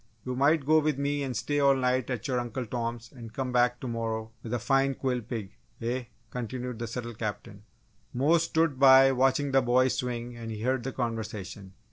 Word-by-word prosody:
You 125 Hz, 0 st, -3 dB
might 140 Hz, +2 st, +3 dB
go 155 Hz, +2 st, +5 dB
with 155 Hz, -2 st, 0 dB
me 145 Hz, +1 st, -1 dB
and 130 Hz, -4 st, -2 dB
stay 145 Hz, +6 st, -1 dB
all 140 Hz, -1 st, +5 dB
night 130 Hz, -1 st, 0 dB
at 125 Hz, -3 st, -3 dB
your 125 Hz, -2 st, 0 dB
Uncle 120 Hz, +1 st, -4 dB
Tom's 115 Hz, 0 st, -4 dB
and 115 Hz, -4 st, -10 dB
come 130 Hz, +2 st, -3 dB
back 125 Hz, 0 st, +2 dB
to 130 Hz, -, -4 dB
morrow 115 Hz, -1 st, -3 dB
with 115 Hz, -, -7 dB
a 120 Hz, -, +1 dB
fine 135 Hz, +3 st, +2 dB
quill 125 Hz, -2 st, -1 dB
pig, 110 Hz, -4 st, -6 dB, 0.3 s
eh?" 120 Hz, +2 st, -2 dB, 0.3 s
continued 125 Hz, 0 st, -5 dB
the 115 Hz, -, -3 dB
subtle 120 Hz, 0 st, -5 dB
Captain. 105 Hz, -2 st, -6 dB, 0.5 s
Mose 150 Hz, +7 st, +3 dB
stood 160 Hz, -4 st, +1 dB
by 135 Hz, 0 st, +8 dB
watching 135 Hz, +2 st, +2 dB
the 135 Hz, 0 st, +4 dB
boys 125 Hz, +1 st, +3 dB
swing 120 Hz, -1 st, -3 dB
and 115 Hz, -1 st, -7 dB
he 110 Hz, -1 st, -5 dB
heard 130 Hz, +1 st, +1 dB
the 135 Hz, -, -3 dB
conversation. 110 Hz, -5 st, -5 dB
125 Hz, 200 wpm, -28 LUFS, 115-135 Hz, 0.5 s, by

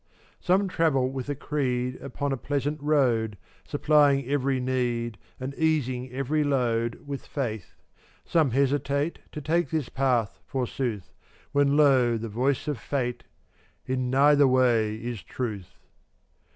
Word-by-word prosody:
434 -, -, -29 dB
Some 200 Hz, 0 st, 0 dB
travel 155 Hz, -8 st, +1 dB
with 135 Hz, 0 st, -5 dB
a 145 Hz, -, -1 dB
creed 125 Hz, -3 st, -2 dB
Upon 140 Hz, +1 st, -3 dB
a -, -, +1 dB
pleasant 145 Hz, +3 st, -2 dB
road, 120 Hz, -8 st, +2 dB, 0.3 s
Supplying 145 Hz, -3 st, +3 dB
every 135 Hz, -1 st, +1 dB
need 120 Hz, -3 st, -1 dB, 0.2 s
And 130 Hz, +2 st, -4 dB
easing 130 Hz, -5 st, 0 dB
every 135 Hz, +4 st, 0 dB
load 120 Hz, -5 st, 0 dB
With 140 Hz, -1 st, -6 dB
faith; 110 Hz, -9 st, -4 dB, 0.5 s
some 160 Hz, -4 st, +2 dB
hesitate 140 Hz, +4 st, 0 dB
To 150 Hz, -, -6 dB
take 165 Hz, +4 st, +1 dB
this 155 Hz, -5 st, -2 dB
path, 125 Hz, -5 st, 0 dB
forsooth, 125 Hz, -5 st, -3 dB, 0.4 s
When 140 Hz, 0 st, +3 dB
lo! 130 Hz, -5 st, +4 dB
the 115 Hz, 0 st, -5 dB
voice 130 Hz, +7 st, 0 dB
of 145 Hz, -6 st, -2 dB
Fate: 125 Hz, -1 st, -3 dB, 0.6 s
"In 130 Hz, -1 st, -1 dB
neither 140 Hz, +2 st, +5 dB
way 120 Hz, -4 st, +3 dB
is 115 Hz, -1 st, -5 dB
Truth." 105 Hz, -8 st, -5 dB
130 Hz, 135 wpm, -26 LUFS, 120-145 Hz, 0.6 s, neither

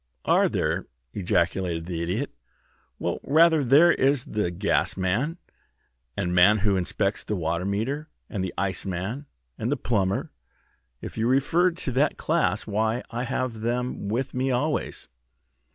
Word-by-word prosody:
"Are -, -, +4 dB
there!" -, -, -1 dB, 0.3 s
ejaculated 85 Hz, -2 st, 0 dB
the 85 Hz, -2 st, -4 dB
Idiot. 95 Hz, +12 st, -2 dB, 0.7 s
"Well, -, -, -2 dB
rather. 160 Hz, +1 st, +4 dB
There 145 Hz, +7 st, +6 dB
is 135 Hz, -3 st, +2 dB
the 105 Hz, -4 st, -1 dB
Gasman, 100 Hz, -, 0 dB, 0.8 s
and 90 Hz, -3 st, -1 dB
man 90 Hz, +4 st, +6 dB
who 100 Hz, -1 st, +1 dB
inspects 95 Hz, +2 st, -1 dB
the 105 Hz, -, -2 dB
water 85 Hz, 0 st, -1 dB
meter, 130 Hz, +10 st, -2 dB, 0.2 s
and 100 Hz, -5 st, -3 dB
the 95 Hz, -, -3 dB
Iceman, 95 Hz, +7 st, -2 dB, 0.3 s
and 115 Hz, +4 st, -1 dB
the 145 Hz, -, +1 dB
Plumber. 100 Hz, -6 st, 0 dB, 0.7 s
If -, -, -6 dB
you 115 Hz, -, +1 dB
refer 145 Hz, +8 st, +3 dB
to 165 Hz, -6 st, -5 dB
that 135 Hz, +5 st, +1 dB
class, 155 Hz, -10 st, 0 dB
why, 110 Hz, +3 st, 0 dB
I 120 Hz, +2 st, -2 dB
have 120 Hz, -3 st, -2 dB
them 120 Hz, -2 st, -2 dB
with 125 Hz, +6 st, -2 dB
me 130 Hz, +1 st, 0 dB
always." 140 Hz, +5 st, -1 dB
110 Hz, 140 wpm, -25 LUFS, 95-135 Hz, 0.8 s, There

